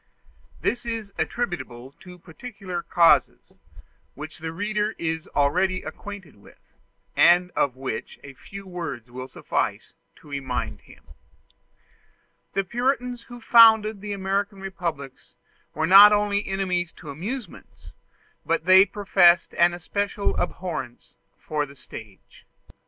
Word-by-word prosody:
This 245 - -1
is 225 -4 -5
attributable 135 - -4
to 180 -1 -13
peculiar 185 +1 -7
causes, 170 -1 +3 0.6
which 155 +3 -9
the 160 0 -5
reader 210 +4 -2
is 160 -1 -3
already 185 +6 +1
acquainted 190 - -9
with, 100 - -19 0.6
and 180 +1 +5
of 135 -6 0
which 130 -4 -6
a 140 - -10
few 195 +8 -11
words 170 -10 -6
will 130 +1 -7
suffice - - -3 0.2
to - - -19
remind 135 -3 -4
him. - - -18 1.5
The 195 - 0
Puritans 245 +2 -1
who 240 0 -9
founded 220 -3 +6
the 205 0 -6
American 195 +1 -2
republics 170 -8 -6 0.4
were 155 +2 0
not 200 +4 +9
only 205 0 +1
enemies 185 -3 -1
to 150 -4 -10
amusements, 200 - -8 0.5
but 165 0 -1
they 190 +2 +7
professed 185 -3 +3
an 175 0 +3
especial 200 +3 -2
abhorrence 175 -9 -5 0.2
for 150 -1 -3
the 140 - -15
stage. 105 -7 -13
180 Hz, 120 wpm, -24 LUFS, 155-205 Hz, 1.5 s, not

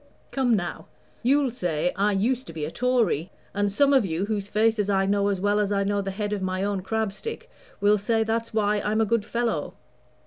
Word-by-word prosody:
"Come 255 -4 +2
now, 175 -4 -4 0.3
you'll 270 +1 +3
say 180 -7 -1
I 205 +1 +2
used 245 +6 0
to 165 - -8
be 155 -2 -3
a 155 - -5
Tory; 230 - +1 0.2
and 205 0 0
some 280 +7 +3
of 265 -4 +5
you, 175 0 -1
whose 205 -2 -2
faces 215 -1 +1
I 195 -1 +2
know 200 0 +2
as 200 -2 0
well 205 +2 +2
as 205 -1 0
I 200 -1 +1
know 200 0 0
the 195 - -4
head 205 +2 -3
of 205 - -2
my 185 0 -1
own 200 -1 -1
crab 220 +2 -1
stick, 455 - -7 0.3
will 205 +1 +4
say 225 +2 +1
that's 225 +1 -2
why 210 -1 +1
I'm 215 +1 0
a - - +3
good 230 0 +1
fellow. 235 +1 -2
205 Hz, 220 wpm, -25 LUFS, 195-225 Hz, 0.3 s, of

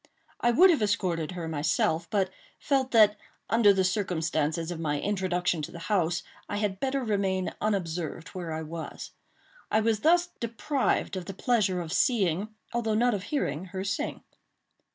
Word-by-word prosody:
I 240 - +2
would 355 +11 +7
have 310 - +1
escorted 185 -6 0
her 170 -2 -5
myself, 160 +2 0
but 195 -3 +1 0.3
felt 270 -2 +1
that, 215 -3 +5 0.3
under 225 -2 +6
the 190 -1 +2
circumstances 165 -4 0
of 170 - -5
my 150 -3 -1
introduction 180 -4 0
to 150 - -5
the - - -9 0.2
house, 175 -3 +1 0.3
I 205 - -2
had 205 -2 -1
better 270 +1 -1
remain 195 -4 0
unobserved 175 -5 -2
where 175 -3 -6
I 160 0 -3
was. 160 +1 -7 0.6
I 215 - +3
was 220 -1 +1
thus 345 +6 +4
deprived 235 +1 -1
of 185 -2 -4
the 195 - -7
pleasure 195 -6 +1
of 165 -1 -5
seeing, 200 - +2 0.3
although 225 -2 0
not 240 +2 +3
of 200 -2 -3
hearing, 190 - -2
her 190 0 -5
sing. 200 0 -3
190 Hz, 165 wpm, -28 LUFS, 170-220 Hz, 0.6 s, would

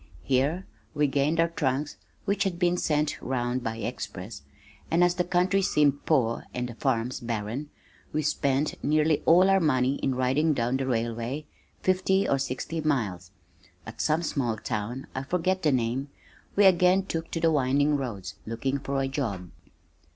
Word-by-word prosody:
Here 140 +8 +1 0.3
we 150 0 +3
gained 145 +3 +1
our 165 0 +4
trunks 145 -2 -1 0.3
(which 200 0 +1
had 190 -4 -2
been 175 0 +2
sent 150 -3 0
round 125 -1 -1
by 115 0 -3
express) 110 - -6 0.5
and 170 +2 +3
as 175 0 +4
the 180 0 0
country 180 +2 +2
seemed 145 -6 +2
poor 120 -7 +1
and 125 0 -2
the 120 - -7
farms 125 0 -1
barren, 115 +5 -4 0.4
we 155 - -1
spent 140 -1 0
nearly 155 +1 +2
all 180 +3 +7
our 195 0 +5
money 135 -5 +2
in 135 - -1
riding 135 +5 +2
down 120 +1 0
the 135 0 -2
railway 120 +4 -2 0.4
fifty 190 +1 +2
or 140 - +2
sixty 140 +5 -3
miles. 105 - -1 0.6
At - - -6
some 160 +3 +1
small 125 -8 -1
town 110 +5 -4
(I 130 - -3
forget 180 +6 0
the 155 - +3
name), 130 +2 -1 0.5
we 205 - +5
again 185 +1 +5
took 165 -3 -4
to 165 - -3
the 165 0 +3
winding 145 +1 +2
roads, 115 - -4
looking 130 +5 -2
for 135 0 -2
a - - 0
job. 105 - -3
140 Hz, 165 wpm, -27 LUFS, 125-165 Hz, 0.6 s, all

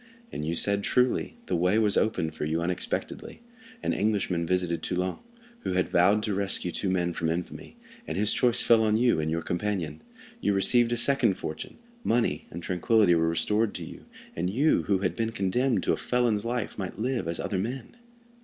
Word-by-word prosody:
And - - -5
you 80 +2 -1
said 100 +3 +1
truly; 125 - +1
the - - -1
way 90 +5 +2
was 105 -2 +2
opened 90 -8 0
for - - -5
you 80 +2 0
unexpectedly. 90 - -4 0.4
An - - 0
Englishman 95 -5 0
visited 90 -2 0
Toulon, 90 +1 -2 0.4
who 165 - -3
had 90 0 +1
vowed 100 +5 +3
to 105 - -1
rescue 95 -2 -1
two 95 - -2
men 90 -2 0
from 80 -1 -1
infamy, 90 - -5 0.3
and - - -3
his 105 +1 +2
choice 125 -1 +2
fell 115 -1 +5
on 110 0 +2
you 120 -7 +3
and 80 0 -1
your 85 +1 -2
companion. 90 0 -3 0.4
You 100 - +1
received 120 +4 +4
a 120 - 0
second 120 -5 +3
fortune, 80 -4 -7 0.3
money 115 0 0
and 85 +1 -8
tranquillity 95 +2 +3
were 80 -1 +2
restored 105 +6 +1
to - - -5
you, - - -11 0.3
and 90 +2 -1
you, 140 +10 +2
who 100 - +3
had 90 -3 -1
been 115 0 -1
condemned 115 +6 +1
to - - +2
a - - -1
felon's 120 -4 0
life, 120 -3 -3
might 95 -2 -5
live 125 -2 -1
as 85 0 -2
other 95 - -2
men. 125 - -5
100 Hz, 195 wpm, -27 LUFS, 85-115 Hz, 0.4 s, fell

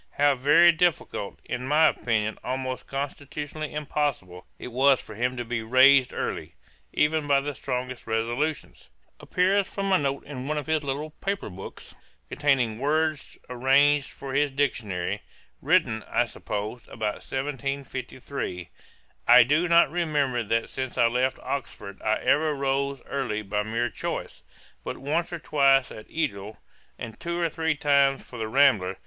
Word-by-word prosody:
How 145 0 +4
very 150 +6 +6
difficult, 165 - -1
and 125 - -3
in 130 - -5
my 150 +3 +5
opinion 110 -2 -1
almost 130 0 -4
constitutionally 145 +2 -5
impossible 145 -11 -3
it - - -7
was 130 +2 +4
for - - -11
him 125 +3 -1
to 120 - -3
be 115 0 -2
raised 130 +3 +5
early, - - -4 0.4
even 150 0 +1
by 140 -1 +4
the 145 +1 -4
strongest 125 -2 -5
resolutions, 120 +7 -2 0.3
appears 190 +2 +1
from 195 -1 -3
a 185 - +5
note 140 -1 -2
in 135 -2 -7
one 155 +1 -1
of 145 - -3
his 155 -1 0
little 145 +3 -3
paper 195 - -4
books, 95 +2 -10 0.4
(containing 130 -7 +1
words 155 +1 -1
arranged 140 +3 +3
for 135 -1 -8
his 145 +1 +2
Dictionary,) 120 -10 -2 0.4
written, 110 0 +2
I 120 - +2
suppose, 110 0 -5
about 110 -2 -4
1753: 135 - -5 0.6
'I 120 0 +9
do 150 +8 +2
not 170 -2 +5
remember 150 -7 0
that 115 +1 -1
since 130 -1 -5
I 120 - +5
left 125 +3 +1
Oxford 120 -7 -5
I 110 0 +1
ever 155 0 +2
rose 140 -1 -1
early 120 -6 -3
by 105 +1 -1
mere 115 +2 -2
choice, - - -5 0.4
but - - -5
once 155 +6 -1
or 170 - -3
twice 140 -4 +3
at 110 - -11
Edial, 110 -10 -3 0.4
and 115 - -8
two 170 0 -3
or 170 -1 +1
three 160 -1 -1
times 140 -1 +3
for 120 - -11
the 110 - -2
Rambler.' 110 -8 +3
135 Hz, 155 wpm, -26 LUFS, 120-150 Hz, 0.6 s, I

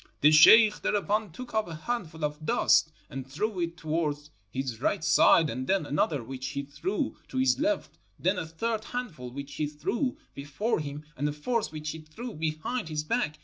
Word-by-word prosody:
"The 150 - +7
sheikh 210 +8 +8
thereupon 210 -1 0
took 250 +9 -9
up 220 -3 +1
a 165 - -6
handful 160 -4 -3
of 150 +1 -5
dust 155 +1 +3 0.2
and 135 -2 -6
threw 205 +7 -2
it 170 0 -2
towards 150 -2 -2 0.2
his 125 0 -4
right 155 - 0
side, 165 0 +5
and 130 -1 -4
then 190 -4 +2
another 145 -2 0
which 130 +2 -6
he 140 +1 -3
threw 170 - -3
to 260 - -6
his 260 0 +3
left, 310 0 -1 0.2
then 185 0 +1
a 160 - -4
third 220 +7 -2
handful 185 - -5
which 140 +2 -7
he 150 +2 -1
threw 165 - -2 0.2
before 145 - -2
him, 150 0 -6
and 145 +3 -1
a - - -2
fourth 220 +10 -1
which 155 -1 -4
he 160 - -7
threw 210 +10 -8
behind 160 +7 -3
his 150 -1 -2
back. 155 -5 -1
155 Hz, 190 wpm, -28 LUFS, 145-215 Hz, 0.2 s, sheikh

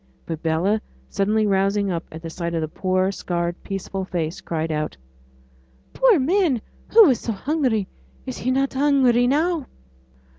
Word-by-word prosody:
But 165 -1 -5
Bella 175 +7 +1 0.3
suddenly 215 +2 +1
rousing 200 0 +1
up 170 -1 -3
at 160 +1 -9
the 165 - -5
sight 170 0 -3
of 165 - 0
the 155 - -1
poor, 185 +3 0
scarred, 175 -2 -2
peaceful 195 -1 -4
face, 170 -3 -3
cried 160 -1 -3
out, 155 - -3 1.0
'Poor - - +5
man 315 - +2 0.3
who 450 -1 +8
was 260 - +3
so 230 - -3
hungry. 245 -3 0 0.4
Is - - -6
he 250 - -2
not 270 +1 +1
hungry 265 -3 +3
now?' 310 +1 +1
200 Hz, 155 wpm, -22 LUFS, 170-265 Hz, 1.0 s, who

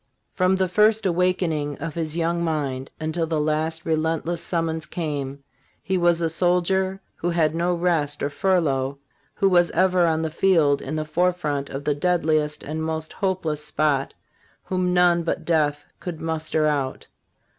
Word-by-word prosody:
From 185 0 +2
the 190 0 +1
first 210 +4 +3
awakening 170 -5 0
of 165 0 -5
his 160 0 -2
young 170 +1 0
mind 140 -5 -2
until 160 +1 -1
the 160 -1 0
last 155 +2 -1
relentless 160 +1 -1
summons 165 -2 -1
came. 140 -4 -4 0.4
he 190 - -1
was 175 -1 +3
a 165 - +2
soldier 185 +2 +1 0.2
who 175 - -1
had 165 -3 +2
no 175 +2 0
rest 165 -4 0
or 145 - -1
furlough, 145 -5 +1 0.4
who 195 - +2
was 175 -2 +4
ever 180 0 +3
on 160 0 +1
the 160 - -2
field 160 -5 +3
in 155 - -4
the 155 0 -2
forefront 155 -3 0
of 135 +1 -5
the 150 - +1
deadliest 155 -1 0
and 155 +2 -4
most 160 0 -3
hopeless 175 -6 -1
spot, 150 -3 0 0.5
whom 185 -1 -1
none 175 -1 +4
but 165 0 -3
death 150 -3 +1
could 175 -3 -6
muster 160 -1 -1
out. 140 -3 -1
160 Hz, 160 wpm, -23 LUFS, 150-180 Hz, 0.5 s, was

